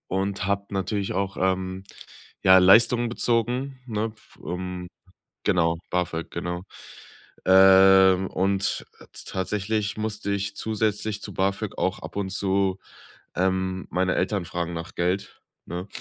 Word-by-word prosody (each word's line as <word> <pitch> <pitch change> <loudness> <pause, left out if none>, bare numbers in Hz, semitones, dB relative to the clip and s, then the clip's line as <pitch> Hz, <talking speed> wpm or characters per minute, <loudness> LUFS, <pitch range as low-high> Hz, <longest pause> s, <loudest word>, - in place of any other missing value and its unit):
und 95 +1 -1
habe 100 +1 -1
natürlich 100 0 -2
auch, 100 0 -2
ähm, 95 0 -1 0.6
ja, 95 0 +8
Leistungen 115 +6 +5
bezogen, 125 +3 -1
ne? 110 -1 -2
F - - -22
ähm, 90 0 -5 0.6
genau, 85 -1 +2
BAföG, 90 -2 -2
genau. 90 +1 -4 0.8
Ähm, 95 0 +7
und, 95 +1 0
äh, - - -14
t - - -8
tatsächlich 100 +2 -2
musste 105 -1 -3
ich 100 0 -2
zusätzlich 110 -1 -2
zu 100 - -7
BAföG 100 +2 -1
auch 95 - -1
ab - - -10
und 95 -2 -2
zu, 95 0 0 0.6
ähm, 95 0 -1
meine 95 +1 +1
Eltern 95 0 -1
fragen 85 0 -4
nach 85 0 -6
Geld, 90 +3 -2 0.2
ne? 90 +3 -6
95 Hz, 130 wpm, -25 LUFS, 95-100 Hz, 0.8 s, ja